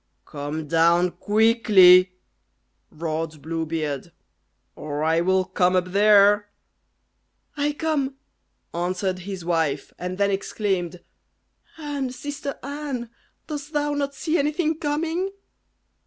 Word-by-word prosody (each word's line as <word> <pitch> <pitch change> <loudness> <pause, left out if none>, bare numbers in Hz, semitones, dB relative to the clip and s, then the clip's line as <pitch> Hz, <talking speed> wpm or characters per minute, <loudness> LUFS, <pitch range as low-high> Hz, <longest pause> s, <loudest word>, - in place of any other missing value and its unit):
"Come 150 +2 -5
down 170 +3 +3
quickly," 205 -5 +5 0.7
roared 160 -1 -4
Blue 160 +2 -4
Beard, 150 -4 -3 0.6
"or 150 0 -4
I 160 +1 +2
will 185 +1 +2
come 180 0 +1
up 180 0 +1
there." 205 +1 +5 1.1
"I 295 0 0
come," 290 -3 -1 0.6
answered 185 +2 -2
his 185 -1 -7
wife, 160 -5 -1
and 180 +1 -4
then 200 0 +2
exclaimed, 190 -3 -2 0.8
"Anne! 290 -4 -3
sister 285 +2 -6
Anne! 280 -4 -5 0.3
dost 295 0 -7
thou 295 0 0
not 280 -1 -2
see 320 +3 0
anything 305 +2 0
coming?" 325 +5 -1
195 Hz, 110 wpm, -24 LUFS, 170-285 Hz, 1.1 s, quickly